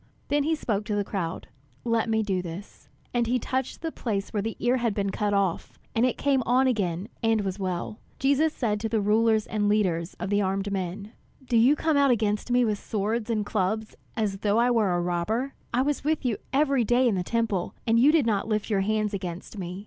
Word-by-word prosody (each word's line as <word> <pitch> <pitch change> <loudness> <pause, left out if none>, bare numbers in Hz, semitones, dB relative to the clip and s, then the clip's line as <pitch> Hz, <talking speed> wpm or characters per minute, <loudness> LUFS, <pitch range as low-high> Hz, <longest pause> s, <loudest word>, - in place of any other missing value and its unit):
Then 290 +1 +2
he 320 +1 +2
spoke 215 -8 -2
to 210 -2 -2
the 205 - +1
crowd, 185 -5 -4 0.4
"Let 230 -1 +1
me 220 0 +2
do 190 -3 -1
this." 180 +3 -9 0.2
And 240 -1 +1
he 250 +2 +2
touched 260 +1 -3
the 325 - -2
place 205 -8 -3
where 210 - 0
the 225 +2 -3
ear 245 +2 +2
had 235 -4 0
been 200 -1 -1
cut 205 +1 -1
off, 195 -4 -1 0.2
and 230 +3 +3
it 255 - -2
came 275 -2 +2
on 255 +3 +3
again 195 -7 0
and 225 -2 +2
was 195 0 -3
well. 185 +2 -3 0.2
Jesus 285 +3 +2
said 215 -8 -1
to 225 +1 -2
the 220 0 +1
rulers 220 +1 +3
and 205 -1 0
leaders 185 -5 0
of 190 - -5
the 205 0 +3
armed 195 +1 -1
men: 195 +2 -4 0.3
"Do 245 - -1
you 240 +6 +6
come 315 0 +1
out 280 -1 +4
against 215 -2 +1
me 245 0 +3
with 210 -2 -1
swords 215 +2 -2
and 215 -3 0
clubs 215 +2 -1 0.2
as 205 -3 0
though 205 +2 +1
I 240 +1 +4
were 220 -5 +2
a - - +1
robber? 190 +10 -1 0.2
I 250 +2 +2
was 290 -1 -1
with 305 -1 0
you 235 -4 +1
every 275 -3 +2
day 245 +3 +3
in 230 - +2
the 185 - 0
Temple, 215 -2 -1
and 230 -1 +3
you 275 +5 +6
did 310 -5 +3
not 210 -3 0
lift 215 0 -1
your 195 -2 +2
hands 215 +1 0
against 185 +2 -5
me. 180 0 -5
215 Hz, 225 wpm, -26 LUFS, 200-245 Hz, 0.4 s, you